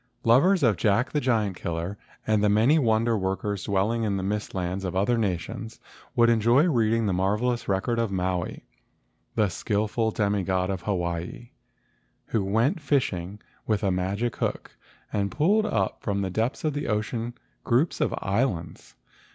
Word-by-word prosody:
Lovers 150 +10 +4
of 110 -7 +3
"Jack 105 +7 +2
the 150 - 0
Giant 110 -7 +1
Killer," 85 +3 -4 0.3
and 110 0 +2
of - - 0
the 105 - +3
many 115 +10 +4
wonder 115 -2 +2
workers 95 0 -2
dwelling 105 +4 +1
in 105 -3 0
the 95 - -3
mist 105 +1 -3
lands 90 +1 -2
of 95 -1 -3
other 100 +6 +2
nations, 105 +1 -3 0.4
would 120 -1 +5
enjoy 115 +4 +4
reading 115 -8 +2
the 100 - +1
marvelous 105 +6 0
record 105 +5 0
of 115 -3 0
Maui, 90 -2 -2 0.7
the 110 -2 +3
skilful 105 +4 -1
demi 100 -2 0
god 95 0 0
of 95 -3 -3
Hawaii, 85 +4 -3 0.7
who 110 -3 -1
went 110 - +1
fish¬ 140 -6 +1
ing 90 +4 -7 0.3
with 110 -1 0
a 100 - +2
magic 100 +6 -1
hook, - - -3 0.4
and 100 -1 0
pulled 205 +8 +2
up 95 -4 -1
from 100 -1 -1
the 95 - -3
depths 110 +7 -1
of 155 -2 0
the 145 +1 -3
ocean 115 +2 -2 0.3
groups 130 +8 +1
of - - +2
islands. 95 -5 -2
105 Hz, 165 wpm, -26 LUFS, 95-120 Hz, 0.7 s, would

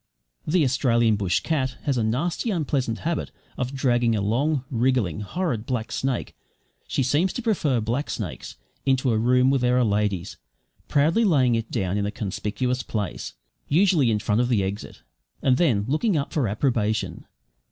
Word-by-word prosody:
The 170 +1 +3
Australian 120 -4 +2
bush 95 -4 0
cat 130 -5 -1
has 140 - 0
a 120 - 0
nasty, 150 - -1
unpleasant 140 - -1
habit 165 -1 -2 0.3
of 125 0 -3
dragging 120 -4 +1
a 105 - 0
long, 130 +7 0
wriggling, 120 - +1
horrid, 120 - -3
black 120 -4 -2
snake 130 -2 -2 0.5
she 135 - 0
seems 150 +9 +2
to - - -4
prefer 160 - +1
black 120 +6 -2
snakes - - -5 0.3
into 130 -2 +2
a 110 - +2
room 125 +3 +3
where 135 - +2
there 125 0 +2
are 125 - +4
ladies, 100 -4 -1 0.5
proudly 160 +10 +3
laying 135 - +3
it 115 -1 -1
down 95 +2 -1
in 100 - 0
a - - -3
conspicuous 105 +5 -2
place 105 - -4 0.3
(usually 165 -5 +3
in 110 - +2
front 105 +1 +1
of 125 - 0
the 110 -6 +2
exit), 100 +2 -6 0.4
and 130 -2 +4
then 120 -12 +2
looking 160 - +1
up 140 - -3
for 140 -7 +1
approbation. 110 -1 -1
125 Hz, 170 wpm, -24 LUFS, 110-140 Hz, 0.5 s, are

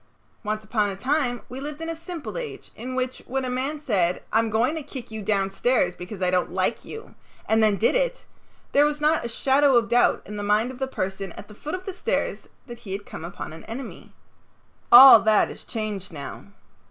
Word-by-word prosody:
Once 215 0 -3
upon 210 -1 0
a 195 - -5
time 255 +2 -1
we 255 - -7
lived 295 +2 -6
in 325 - -5
a 330 - -3
simple 335 -1 -7
age - - -7
in 255 +2 -6
which 255 0 -2
when 265 +1 -2
a 250 - -3
man 270 +4 -2
said, 185 - 0
"I'm 225 +1 +3
going 230 +7 +1
to - - -3
kick 265 -5 -9
you 220 -1 -5
downstairs 195 0 +1
because 185 +2 -7
I 180 - +2
don't 180 -1 0
like - - -1
you," 445 +1 -10 0.3
and 220 0 +3
then 215 -2 +4
did 220 - +2
it, - - -1 0.5
there 290 +1 +5
was 295 0 -3
not 305 0 +2
a - - -2
shadow 270 +3 +3
of 230 -1 +1
doubt 240 +1 +3
in 210 - -7
the - - -3
mind 210 +4 +1
of 260 - -12
the 265 - -1
person 190 -5 -4
at 205 - -11
the 210 - -13
foot 300 - -5
of 370 0 -8
the 385 - -4
stairs - - -2 0.2
that 240 -2 -10
he 205 -5 -7
had 200 +1 -5
come - - -9
upon 170 -1 -7
an 160 - -11
enemy. 235 +3 -8 0.8
All 255 -1 +11
that 215 0 +3
is - - -11
changed 210 -4 -5
now. 145 -4 -8
235 Hz, 220 wpm, -24 LUFS, 205-275 Hz, 0.8 s, All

